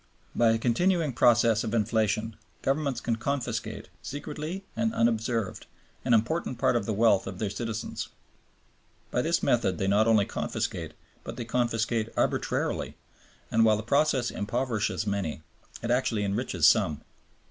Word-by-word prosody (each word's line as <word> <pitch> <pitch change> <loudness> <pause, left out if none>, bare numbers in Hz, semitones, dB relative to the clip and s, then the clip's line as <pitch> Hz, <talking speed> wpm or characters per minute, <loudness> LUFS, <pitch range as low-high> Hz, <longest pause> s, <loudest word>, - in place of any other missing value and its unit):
By 120 -1 +4
a 115 - +3
continuing 155 +6 +1
process 115 -1 +4
of 115 0 -2
inflation, 110 0 0 0.3
governments 135 -3 0
can 115 -1 -1
confiscate, 140 +2 -3
secretly 155 +6 -5
and 220 +1 0
unobserved, 115 -2 0 0.4
an 120 -2 +4
important 125 +3 0
part 120 - +2
of 115 -4 0
the - - 0
wealth 105 -2 +3
of 95 - -6
their 105 0 -2
citizens. 115 -1 -4 1.0
By - - +1
this - - 0
method - - +2
they 95 - -1
not 105 +3 +3
only 110 -3 +4
confiscate, - - -3 0.3
but - - -6
they 120 - -4
confiscate 115 -1 0
arbitrarily; - - -1 0.5
and, 115 - +4
while 110 -1 +5
the 110 - -5
process 135 0 +2
impoverishes 110 0 -1
many, 100 -7 -2 0.4
it 120 - -1
actually 120 -4 +1
enriches 100 0 +2
some. 75 -2 +3
115 Hz, 145 wpm, -28 LUFS, 110-125 Hz, 1.0 s, while